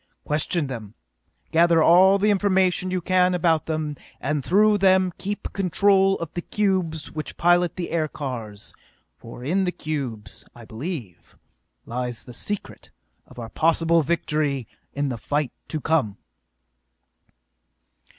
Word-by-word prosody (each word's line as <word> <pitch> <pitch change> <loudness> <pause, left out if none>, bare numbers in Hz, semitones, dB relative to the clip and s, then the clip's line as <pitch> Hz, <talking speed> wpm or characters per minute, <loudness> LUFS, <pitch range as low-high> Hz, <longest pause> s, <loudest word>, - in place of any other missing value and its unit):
Question 155 +2 0
them, 115 -6 -7 0.6
gather 165 0 +4
all 190 +4 +6
the 210 +2 +2
information 190 -2 +2
you 185 0 -1
can 180 +1 +2
about 165 -3 +1
them, 155 -2 -2 0.2
and 145 +1 -2
through 210 +5 +4
them 185 -1 +4
keep 205 +1 -5
control 195 +1 +3
of 170 -1 -6
the 175 - -3
cubes 180 -7 -1
which 155 -1 -6
pilot 175 +1 +3
the 180 -2 -5
aircars, 130 -10 -4 0.4
for 115 +1 -11
in 180 +8 +1
the 180 - 0
cubes, 140 -11 -5
I 120 -1 -12
believe, 120 - -7 0.5
lies 125 0 -4
the 125 - -11
secret 135 - -5 0.4
of - - -17
our 115 -2 -6
possible 165 +3 +2
victory 150 -5 -1 0.2
in 140 0 -2
the 120 -3 -4
fight 145 0 -1 0.2
to 155 - -3
come!" 140 -10 0
160 Hz, 130 wpm, -24 LUFS, 135-185 Hz, 0.6 s, all